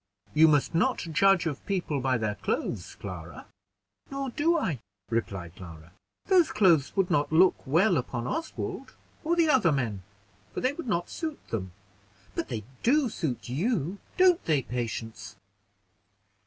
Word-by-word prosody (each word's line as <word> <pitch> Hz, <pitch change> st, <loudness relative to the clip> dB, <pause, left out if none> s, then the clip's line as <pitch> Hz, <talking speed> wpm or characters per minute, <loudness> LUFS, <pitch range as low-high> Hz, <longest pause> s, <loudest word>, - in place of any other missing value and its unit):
"You 160 Hz, +1 st, +7 dB
must 150 Hz, -1 st, +2 dB
not 250 Hz, +10 st, +2 dB
judge 180 Hz, +3 st, +3 dB
of 150 Hz, -4 st, -3 dB
people 180 Hz, -7 st, -1 dB
by 130 Hz, 0 st, +1 dB
their 110 Hz, -2 st, -1 dB
clothes, 105 Hz, -, -3 dB
Clara." -, -, -8 dB, 0.6 s
"Nor 275 Hz, -1 st, -3 dB
do 330 Hz, +6 st, +2 dB
I," 165 Hz, -, -1 dB, 0.3 s
replied 95 Hz, -7 st, -3 dB
Clara. 85 Hz, -2 st, -11 dB, 0.3 s
"Those 365 Hz, -4 st, +4 dB
clothes 175 Hz, -9 st, +3 dB
would 195 Hz, -2 st, +1 dB
not 145 Hz, -3 st, +2 dB
look 180 Hz, +4 st, +6 dB
well 175 Hz, +6 st, +4 dB
upon 120 Hz, -2 st, -3 dB
Oswald, 320 Hz, -, -4 dB, 0.3 s
or 335 Hz, +2 st, +1 dB
the 335 Hz, -2 st, +3 dB
other 255 Hz, -, +4 dB
men, 115 Hz, -9 st, -1 dB, 0.5 s
for -, -, -1 dB
they 255 Hz, +2 st, +1 dB
would 315 Hz, -2 st, -7 dB
not 175 Hz, -5 st, -1 dB
suit 315 Hz, -3 st, -5 dB
them; 95 Hz, -5 st, -3 dB, 0.6 s
but -, -, -3 dB
they 115 Hz, -4 st, -4 dB, 0.2 s
do 270 Hz, +1 st, +3 dB
suit 155 Hz, -, -3 dB
you: 180 Hz, -, -1 dB, 0.2 s
don't 365 Hz, -2 st, +5 dB
they, 150 Hz, -5 st, +2 dB
Patience?" 110 Hz, -6 st, -5 dB
165 Hz, 150 wpm, -28 LUFS, -, 0.6 s, You